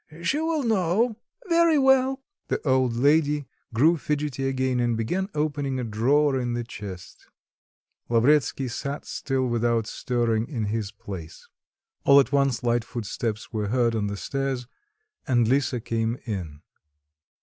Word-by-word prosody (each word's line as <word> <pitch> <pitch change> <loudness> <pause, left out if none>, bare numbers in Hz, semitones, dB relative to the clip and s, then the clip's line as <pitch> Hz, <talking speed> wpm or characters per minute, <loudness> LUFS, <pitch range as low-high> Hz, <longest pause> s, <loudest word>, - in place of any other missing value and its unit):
she 275 - +1
will 320 -2 0
know." 220 +1 +1 0.3
"Very 335 -2 +4
well." 265 0 +3 0.2
The - - -1
old 130 -3 +2
lady 145 +2 +3 0.3
grew 155 +9 +4
fidgety 145 -3 -2
again 130 -1 0
and 120 -2 +1
began 180 - -1
opening 145 -3 -1
a - - -2
drawer 130 +6 +2
in 120 -1 -2
the 120 0 -2
chest. 100 -6 -9 0.8
Lavretsky 130 +2 +3
sat 140 +4 -4
still 135 -2 -2
without 120 -2 +1
stirring 115 -1 -1
in 120 -7 -3
his 110 -3 -2
place. 85 -6 -9 0.6
All 140 0 +7
at 135 - +2
once 140 -4 +1
light 120 -1 +1
footsteps 115 -1 -4
were 105 -2 -1
heard 120 +1 +2
on 105 -2 -1
the 100 0 -4
stairs 135 +1 -2 0.6
and 120 -4 +3
Lisa 130 0 +1
came 115 +1 -1
in. 85 -9 -5
130 Hz, 140 wpm, -25 LUFS, 115-150 Hz, 0.8 s, All